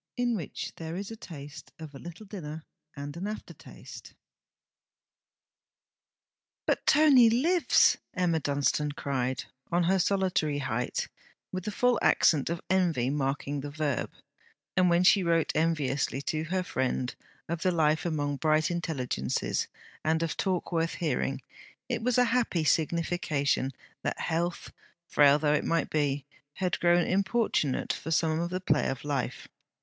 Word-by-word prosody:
IN 245 -1 +1
WHICH 170 -9 -5
THERE 165 0 -5
IS 200 +3 -5
A - - -6
TASTE 150 -8 -10
OF 155 -2 -9
A 135 - -9
LITTLE 175 +7 -10
DINNER 160 -6 -7 0.3
AND 145 0 -6
AN 185 +4 -4
AFTERTASTE 215 +1 -9 2.5
'But - - +1
Tony 280 -6 +7
lives!' 320 +10 +4 0.2
Emma 175 -3 +1
Dunstane 145 0 0
cried, 130 -3 -2 0.3
on 175 +1 +2
her 190 +3 +2
solitary 185 -6 +1
height, 125 -4 -2 0.4
with 185 -1 -4
the 210 - -2
full 245 +3 +2
accent 150 -3 +3
of 170 0 -3
envy 170 -9 +2
marking 140 0 -2
the 145 - -5
verb; 145 -4 -2 0.7
and 180 -1 +4
when 170 +1 +4
she 195 +2 +6
wrote 165 -2 +2
enviously 150 -4 0
to 155 +1 -2
her 185 +2 -1
friend 130 -5 -1 0.3
of 165 0 -3
the 185 - +2
life 155 -2 +2
among 145 -4 -1
bright 155 +2 +2
intelligences, 140 - -2 0.4
and 160 +1 +1
of 165 - -2
talk 185 -3 -1
worth 165 -1 0
hearing, 135 -4 -1 0.4
it 240 -2 -2
was 250 +1 +1
a 250 - +5
happy 230 -10 +1
signification 155 -4 +1 0.3
that - - -3
health, 170 +2 -2 0.3
frail 145 -3 +5
though 150 -1 +2
it 150 - +1
might 165 0 0
be, 145 -3 0 0.3
had 185 -2 -1
grown 175 0 +4
importunate 195 - +1
for 160 - -6
some 160 0 +2
of 170 +1 -1
the 185 +1 -2
play 150 -5 +1
of 135 -1 -4
life. 145 -3 -3
160 Hz, 145 wpm, -29 LUFS, 145-185 Hz, 2.5 s, Tony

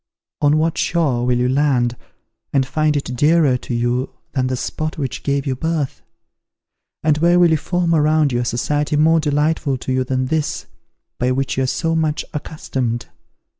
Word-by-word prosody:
On 145 +1 +4
what 160 +1 0
shore 135 -8 +1
will 125 -1 +2
you 125 0 +1
land, 130 -3 +1 0.6
and 135 -2 +2
find 155 +2 +1
it 130 -3 -4
dearer 150 0 +4
to 125 - -5
you 120 +2 0 0.2
than 130 -2 0
the 130 0 -2
spot 155 +4 -4
which 135 -5 -3
gave 140 -1 -1
you 135 -2 -1
birth? 160 -1 -2 1.0
and 155 -1 +2
where 170 +2 +4
will 175 -2 +5
you 160 - +4
form 175 +2 0
around 155 -1 +3
you 120 - 0
a 120 - -1
society 145 +6 -1
more 160 +2 +4
delightful 150 -1 0
to 130 +1 -3
you 130 0 +1
than 130 0 -1
this, 155 +2 -2 0.5
by 125 - +1
which 135 +1 -1
you 135 - 0
are 130 - +1
so 165 +5 -1
much 155 -2 0
accustomed? 130 -6 -3
145 Hz, 180 wpm, -19 LUFS, 130-155 Hz, 1.0 s, will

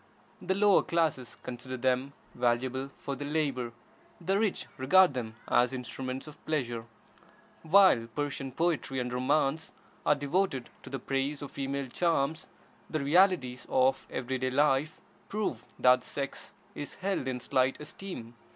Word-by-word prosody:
The 190 - 0
lower 200 -1 +5
classes 160 -8 -1
consider 125 +1 -6
them 130 +2 0 0.2
valuable 125 +2 0
for 140 - -4
their 145 +2 -5
labor, 140 -6 0 0.5
the 190 +3 +1
rich 215 -3 0
regard 180 +5 +6
them 115 -3 -4
as 125 +2 +3
instruments 130 +1 -5
of 150 -1 -13
pleasure. 120 -7 -1 0.8
While 165 -8 +5
Persian 140 -2 -3
poetry 155 -3 0
and 125 0 -3
romance 140 +4 +1 0.3
are 150 - +4
devoted 145 -2 -1
to - - -10
the 135 - -3
praise 135 +3 -2
of 140 - -7
female 140 0 -2
charms, 155 +2 0 0.4
the 155 - -1
realities 145 -6 +3
of 130 +1 +2
every 130 +1 -3
day 130 0 0
life 145 +3 +2 0.3
prove 215 0 -2
that 125 0 +5
the - - -14
sex 140 -1 -5 0.2
is 145 - -6
held 190 -8 -2
in 130 -1 -2
slight 130 +1 +1
esteem. 150 -6 -8
135 Hz, 145 wpm, -30 LUFS, 130-155 Hz, 0.8 s, regard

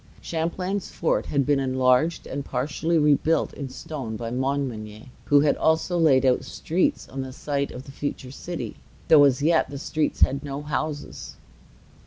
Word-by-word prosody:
Champlain's 180 +4 -3
fort 165 - 0
had 140 -2 +1
been 145 0 +2
enlarged 130 +4 +2
and 140 +1 -4
partly 145 +6 -1
rebuilt 150 +1 +2
in 140 -2 -6
stone 130 -5 -6
by 115 +1 -5
Montmagny, 125 -3 -3
who 145 -1 +5
had 145 -1 +3
also 160 +3 +1
laid 150 -6 +4
out 125 -1 +3
streets 175 +3 -1
on 135 - -5
the 130 0 -6
site 140 +1 -2
of 125 - -8
the 135 - -11
future 135 -2 -5
city, 175 +5 -6 0.3
though 150 -3 +8
as 140 0 +2
yet 165 -3 +3
the 140 - -6
streets 155 +2 -2
had 140 +2 +3
no 140 0 -5
houses. 150 0 -4
140 Hz, 165 wpm, -25 LUFS, 130-155 Hz, 0.3 s, though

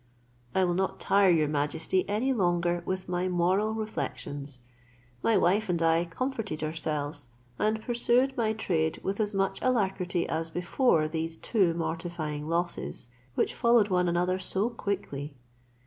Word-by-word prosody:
I 190 - +4
will 175 -1 +2
not 190 +2 -1
tire 200 -1 +4
your 160 -3 +4
majesty 150 +6 0
any 235 +6 +1
longer 175 -4 +1
with 185 0 -2
my 180 0 -1
moral 185 +5 +1
reflections. 140 - -3 0.6
My 225 - +3
wife 200 +4 +2
and 175 -2 +1
I 165 +1 +3
comforted 215 - -3
ourselves, 150 -3 -3 0.3
and 215 +1 +2
I - - -12
pursued 245 +3 +2
my 220 -2 +1
trade 160 -7 0
with 195 +2 -2
as 210 -1 0
much 195 0 0
alacrity 190 -7 0
as 160 +1 -2
before 175 - +2
these 160 +1 -3
two 185 -6 +1
mortifying 160 -2 -3
losses, 170 -7 -2 0.3
which - - +1
followed 235 -3 +4
one 180 -1 +2
another 180 +2 +1
so 200 +5 0
quickly. 155 -10 -4
180 Hz, 145 wpm, -28 LUFS, 160-210 Hz, 0.6 s, I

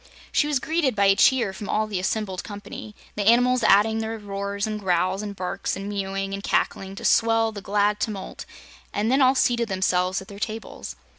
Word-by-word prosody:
She 295 - +2
was 295 -2 +1
greeted 305 -2 0
by 200 -1 +3
a 195 0 +5
cheer 240 -3 +3
from 200 +1 -7
all 215 +1 +1
the 205 -3 -3
assembled 190 0 -2
company, 205 +1 -9 0.2
the 205 -1 -2
animals 245 +2 +4
adding 220 +1 +4
their 225 0 -3
roars 200 -1 -4
and 215 -1 -3
growls 185 0 0
and 205 -1 -6
barks 190 +1 -3
and 195 +1 -6
mewing 195 -1 -3
and 200 0 -5
cackling 195 -1 -1
to - - -7
swell 225 0 +3
the 205 -2 -8
glad 205 +1 +1
tumult, 205 -4 -5 0.4
and 215 +3 0
then 270 +2 +3
all 260 0 +5
seated 235 -3 +1
themselves 185 -1 +1
at 190 - -11
their 200 0 -10
tables. 220 +1 -5
205 Hz, 200 wpm, -24 LUFS, 195-225 Hz, 0.4 s, a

